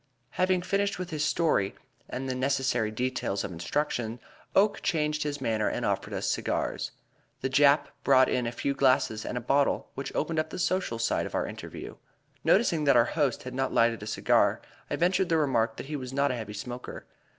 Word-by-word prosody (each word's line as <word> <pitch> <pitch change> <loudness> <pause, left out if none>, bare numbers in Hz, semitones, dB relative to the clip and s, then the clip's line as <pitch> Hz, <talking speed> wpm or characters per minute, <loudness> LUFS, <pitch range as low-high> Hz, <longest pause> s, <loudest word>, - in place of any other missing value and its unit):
Having 185 -1 +1
finished 200 +1 0
with 180 -1 -5
his 150 -1 -1
story 150 - +1 0.3
and 135 +1 -4
the 130 - -1
necessary 130 -3 0
details 115 -3 -2
of 95 - -4
instruction, 115 - -2 0.4
Oakes 205 +1 +3
changed 150 -3 0
his 145 -1 -2
manner 110 -2 0
and - - -2
offered - - -1
us - - -2
cigars. - - -1 0.5
The 130 - -2
Jap 145 +2 +6 0.2
brought 130 -1 +6
in 125 -2 0
a - - -2
few 140 +3 -1
glasses 130 -5 +2
and 125 - -3
a - - -2
bottle, 140 +4 +1
which 135 - -5
opened 160 +1 0
up 155 - -1
the - - -6
social 185 -9 0
side 115 - 0
of - - -7
our - - +1
interview. - - -8 0.5
Noticing 155 -3 +3
that 140 -3 +5
our 120 - +6
host 145 -6 0
had 125 - -7
not 135 0 -1
lighted 115 -1 +3
a 105 - -7
cigar, - - +2 0.3
I - - 0
ventured 180 +2 +2
the 165 - +3
remark 120 -7 +1
that - - -6
he 150 +2 -5
was 130 -3 -5
not 140 +1 +1
a - - -2
heavy 110 -3 -6
smoker. 120 +4 -7
135 Hz, 200 wpm, -28 LUFS, 120-155 Hz, 0.5 s, Jap